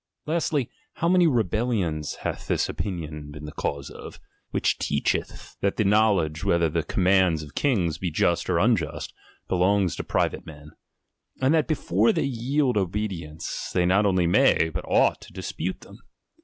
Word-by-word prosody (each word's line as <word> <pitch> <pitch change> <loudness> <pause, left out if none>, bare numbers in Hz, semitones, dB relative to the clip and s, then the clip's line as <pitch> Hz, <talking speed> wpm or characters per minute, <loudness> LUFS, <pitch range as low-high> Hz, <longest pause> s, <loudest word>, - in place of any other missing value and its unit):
Lastly, 155 -5 0 0.3
how 170 - -1
many 180 -1 +5
rebellions 110 - 0
hath - - -4
this - - +1
opinion 75 -6 -5
been 75 0 -9
the 75 - -7
cause 70 -2 -4
of, - - -10 0.3
which - - 0
teacheth 70 - -2
that 100 - 0
the 110 - +2
knowledge 100 -7 +2
whether 85 -1 +2
the 85 +2 0
commands 90 -2 +2
of 75 - -12
kings 90 - 0
be 90 - -1
just 85 +2 0
or 90 - +2
unjust, 90 -6 0 0.3
belongs 95 0 +2
to - - -4
private - - -1
men; 75 -1 -11 0.7
and 130 +3 +3
that 160 -2 +2
be 155 - +1
fore 105 -2 +2
they - - 0
yield 130 0 0
obedience, 90 -5 -3
they 90 - +3
not 100 +3 +3
only 90 -3 +2
may, 85 -1 +4
but 75 - -3
ought - - +3
to - - -14
dispute 95 +3 -4
them - - -14
95 Hz, 165 wpm, -25 LUFS, 80-110 Hz, 0.7 s, many